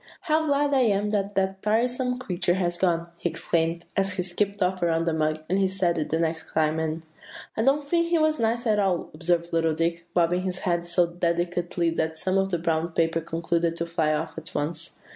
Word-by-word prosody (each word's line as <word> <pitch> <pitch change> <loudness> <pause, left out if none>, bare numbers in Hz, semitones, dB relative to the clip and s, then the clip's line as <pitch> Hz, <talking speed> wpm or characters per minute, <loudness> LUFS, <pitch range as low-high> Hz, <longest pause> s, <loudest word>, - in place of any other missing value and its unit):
"'How 315 -2 +1
glad 285 0 +2
I 270 - +4
am 210 -4 +2
that 200 -1 -1
that 190 0 0
tiresome 250 +3 +1
creature 180 -7 0
has 175 -2 -1
gone!' 170 -2 +1
he 175 - -1
exclaimed, 165 +1 -1
as 195 -1 +1
he 180 - -1
skipped 200 +2 -1
off 185 0 0
around 165 -1 +1
the 165 - +1
mug. 155 0 0
And 190 +3 +1
he 195 - +3
said 185 -3 0
it 150 - -2
the 160 - +1
next 165 0 -2
time, 155 0 +1
and" 160 0 -2 0.5
"I - - 0
don't 280 +4 +2
think 335 +2 +2
he 340 0 +2
was 310 -1 +2
nice 230 +1 0
at 215 -2 +2
all," 190 -4 0
observed 170 +1 0
little 165 -1 +2
Dick, 170 +1 -1
bobbing 175 +1 +3
his 185 -1 -3
head 175 -1 0
so 175 +1 +4
decidedly 170 0 -1
that 160 -1 -1
some 185 +4 +1
of 195 0 0
the 175 - 0
brown 165 0 -1
paper 165 0 +1
concluded 165 +1 -1
to 170 - -1
fly 165 -2 0
off 155 +2 -2
at 160 - -10
once. 160 +3 -2
175 Hz, 220 wpm, -26 LUFS, 165-200 Hz, 0.5 s, I